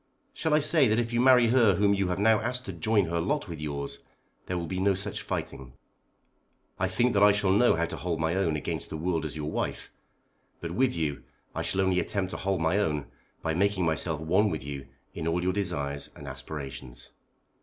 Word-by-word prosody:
Shall 160 Hz, -2 st, +1 dB
I -, -, +6 dB
say 155 Hz, -2 st, +4 dB
that 110 Hz, 0 st, +2 dB
if 120 Hz, 0 st, -1 dB
you 120 Hz, -, +2 dB
marry 125 Hz, -2 st, +6 dB
her 115 Hz, -6 st, +5 dB
whom 100 Hz, +2 st, +3 dB
you 100 Hz, -1 st, 0 dB
have 90 Hz, -, -1 dB
now 110 Hz, +1 st, +4 dB
asked 125 Hz, +2 st, -2 dB
to 95 Hz, -, -5 dB
join 100 Hz, +4 st, +2 dB
her 85 Hz, 0 st, -1 dB
lot 145 Hz, -, -1 dB
with 80 Hz, -4 st, -7 dB
yours, 70 Hz, -2 st, -4 dB, 0.5 s
there 90 Hz, -, -2 dB
will 85 Hz, -, -3 dB
be 90 Hz, +2 st, -3 dB
no 95 Hz, 0 st, +3 dB
such 95 Hz, +2 st, -3 dB
fighting? 65 Hz, -2 st, -5 dB, 1.1 s
I 95 Hz, -, +2 dB
think 120 Hz, +7 st, +1 dB
that 100 Hz, -, +2 dB
I 105 Hz, 0 st, +8 dB
shall 100 Hz, -2 st, +1 dB
know 120 Hz, +5 st, +4 dB
how 85 Hz, 0 st, +1 dB
to -, -, -6 dB
hold 85 Hz, -2 st, -2 dB
my 80 Hz, +1 st, +1 dB
own 90 Hz, -4 st, +1 dB
against 75 Hz, -, -3 dB
the 80 Hz, -, -5 dB
world 80 Hz, -1 st, -1 dB
as 80 Hz, 0 st, -5 dB
your 75 Hz, 0 st, -3 dB
wife. -, -, -3 dB, 0.7 s
But 85 Hz, -, -5 dB
with 125 Hz, +7 st, +1 dB
you 75 Hz, -4 st, -2 dB, 0.3 s
I -, -, -3 dB
shall 95 Hz, -, 0 dB
only 95 Hz, -1 st, +2 dB
attempt 95 Hz, +1 st, -2 dB
to -, -, -4 dB
hold 95 Hz, -2 st, -1 dB
my 80 Hz, +5 st, +2 dB
own 75 Hz, -8 st, -1 dB, 0.3 s
by 80 Hz, -, 0 dB
making 95 Hz, +1 st, +1 dB
myself 80 Hz, 0 st, 0 dB
one 95 Hz, +7 st, +2 dB
with 80 Hz, -6 st, -4 dB
you 70 Hz, -1 st, -6 dB, 0.3 s
in 80 Hz, -1 st, -4 dB
all 85 Hz, +2 st, 0 dB
your 90 Hz, 0 st, +1 dB
desires 70 Hz, -8 st, -2 dB
and -, -, -10 dB
aspirations. 65 Hz, -5 st, -8 dB
90 Hz, 220 wpm, -28 LUFS, 80-105 Hz, 1.1 s, I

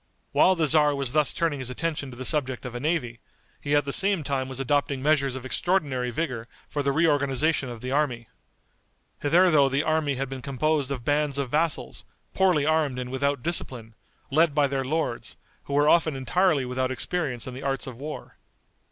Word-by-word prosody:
While 190 Hz, -, +4 dB
the 165 Hz, -2 st, +1 dB
tzar 150 Hz, -1 st, +4 dB
was 140 Hz, -2 st, -3 dB
thus 150 Hz, -1 st, +2 dB
turning 160 Hz, -4 st, -1 dB
his 130 Hz, -1 st, -4 dB
attention 145 Hz, +1 st, -3 dB
to 120 Hz, -, -11 dB
the 130 Hz, -, -5 dB
subject 130 Hz, -5 st, 0 dB
of 125 Hz, -, -6 dB
a 120 Hz, -, -4 dB
navy, 130 Hz, -6 st, -2 dB, 0.4 s
he 145 Hz, 0 st, 0 dB
at 145 Hz, -, +2 dB
the 140 Hz, -, -2 dB
same 195 Hz, -4 st, +4 dB
time 135 Hz, -2 st, -2 dB
was 130 Hz, 0 st, -7 dB
adopting 140 Hz, 0 st, 0 dB
measures 140 Hz, -3 st, +2 dB
of 130 Hz, -1 st, -7 dB
extraordinary 135 Hz, -5 st, 0 dB
vigor 120 Hz, -4 st, -3 dB, 0.2 s
for 145 Hz, -, -3 dB
the 140 Hz, 0 st, +1 dB
reorganization 145 Hz, -2 st, +1 dB
of 120 Hz, -2 st, -8 dB
the 130 Hz, -, -5 dB
army. 130 Hz, -5 st, -1 dB, 0.9 s
Hitherto 155 Hz, -2 st, +4 dB
the 135 Hz, +2 st, 0 dB
army 155 Hz, -3 st, 0 dB
had 135 Hz, +1 st, -3 dB
been 130 Hz, 0 st, -7 dB
composed 140 Hz, +2 st, -1 dB
of 130 Hz, -4 st, -5 dB
bands 145 Hz, -1 st, +1 dB
of 135 Hz, -3 st, -2 dB
vassals, 160 Hz, +1 st, 0 dB, 0.3 s
poorly 180 Hz, -7 st, +2 dB
armed 155 Hz, -4 st, +1 dB
and 125 Hz, 0 st, -5 dB
without 140 Hz, -1 st, -1 dB
discipline, 125 Hz, -9 st, 0 dB, 0.4 s
led 155 Hz, +1 st, +3 dB
by 145 Hz, -1 st, +4 dB
their 135 Hz, -1 st, -1 dB
lords, 145 Hz, -3 st, -3 dB, 0.3 s
who 140 Hz, -, -6 dB
were 145 Hz, +1 st, +3 dB
often 160 Hz, -2 st, +3 dB
entirely 140 Hz, +2 st, +1 dB
without 130 Hz, +1 st, -2 dB
experience 130 Hz, -2 st, -2 dB
in 130 Hz, -, -7 dB
the 130 Hz, -, -8 dB
arts 135 Hz, -1 st, -2 dB
of 130 Hz, -, -8 dB
war. 150 Hz, +5 st, -8 dB
140 Hz, 195 wpm, -25 LUFS, 130-155 Hz, 0.9 s, While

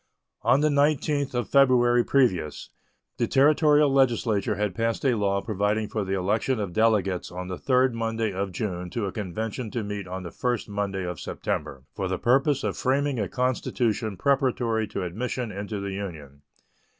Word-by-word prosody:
On 135 Hz, +3 st, +3 dB
the 155 Hz, -, +3 dB
19th 145 Hz, -1 st, +1 dB
of 120 Hz, -3 st, -1 dB
February 120 Hz, -3 st, +4 dB
previous 95 Hz, -, 0 dB, 0.5 s
the -, -, +1 dB
Territorial 150 Hz, 0 st, +4 dB
legislature 115 Hz, -6 st, +2 dB
had 105 Hz, -1 st, -1 dB
passed 115 Hz, +6 st, -1 dB
a 130 Hz, -, +4 dB
law 100 Hz, -3 st, 0 dB
providing 105 Hz, 0 st, -1 dB
for 110 Hz, -, -2 dB
the 95 Hz, 0 st, -2 dB
election 110 Hz, +6 st, 0 dB
of 100 Hz, -4 st, -3 dB
delegates 105 Hz, -4 st, +1 dB
on 90 Hz, +1 st, -6 dB
the 90 Hz, -, -4 dB
third 130 Hz, -1 st, +2 dB
Monday 115 Hz, -2 st, -2 dB
of 95 Hz, +1 st, -3 dB
June 90 Hz, -2 st, -4 dB
to 110 Hz, +2 st, -3 dB
a 95 Hz, -, -3 dB
convention 110 Hz, +4 st, -4 dB
to 115 Hz, +1 st, -3 dB
meet 100 Hz, -2 st, -5 dB
on 95 Hz, +1 st, -5 dB
the 85 Hz, -, -7 dB
first 120 Hz, -3 st, -2 dB
Monday 100 Hz, -2 st, -2 dB
of 90 Hz, -3 st, -5 dB
September 65 Hz, -1 st, -4 dB
for 95 Hz, -, -3 dB
the 95 Hz, 0 st, -1 dB
purpose 135 Hz, -, +2 dB
of -, -, -1 dB
framing 135 Hz, 0 st, 0 dB
a 100 Hz, -, -1 dB
constitution 120 Hz, -4 st, -1 dB
preparatory 120 Hz, -3 st, +1 dB
to 100 Hz, -1 st, -4 dB
admission 115 Hz, +6 st, -3 dB
into 100 Hz, +1 st, -5 dB
the 100 Hz, 0 st, -4 dB
Union. 80 Hz, -8 st, -7 dB
110 Hz, 175 wpm, -26 LUFS, 95-125 Hz, 0.5 s, February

